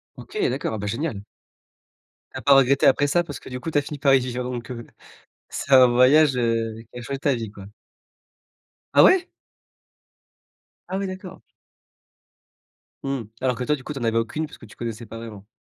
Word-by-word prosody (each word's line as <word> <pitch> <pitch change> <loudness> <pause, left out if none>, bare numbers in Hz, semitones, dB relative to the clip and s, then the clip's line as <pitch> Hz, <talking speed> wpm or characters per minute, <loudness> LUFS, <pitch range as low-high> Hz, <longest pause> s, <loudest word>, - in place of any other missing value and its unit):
OK! 430 - -10
D'accord, - - -2
ah - - -2
beh 105 0 -4
génial! 115 -1 -3 1.1
Tu - - -6
as - - -10
pas 140 - +6
regretté 135 0 +4
après 145 +2 +4
ça 175 +4 +2
parce 145 -3 -8
que - - -12
du 125 0 -5
coup 160 - -5
tu - - +1
as 145 - +4
fini 145 0 -7
par 140 -2 +4
y 135 - +6
vivre 125 0 -4
donc 125 -1 -5
heu, 115 -1 -7 0.6
c'est 140 - -2
un 130 -1 +9
voyage, 130 +4 +5
heu, 115 -2 0 0.2
qui 125 - -7
a - - -7
changé 135 +3 -5
ta 140 -2 +1
vie 110 -3 -5
quoi. 100 -2 -11 1.3
Ah - - +7
ouais? 370 0 +5 1.6
Ah 190 - -2
oui 195 0 -2
d'accord. 185 -1 -8 1.6
Mmh. 135 -3 -2 0.2
Alors 130 -1 +1
que 125 - -4
toi, 150 +4 +1
du 135 - -12
coup, 150 - -5
tu 135 - -6
en - - -5
avais 115 0 +1
aucune 120 +8 -1
puisque 145 - -13
tu - - -16
connaissais 115 -1 -5
pas 115 +1 -9
vraiment. 105 -3 -9
125 Hz, 205 wpm, -23 LUFS, 115-145 Hz, 1.6 s, un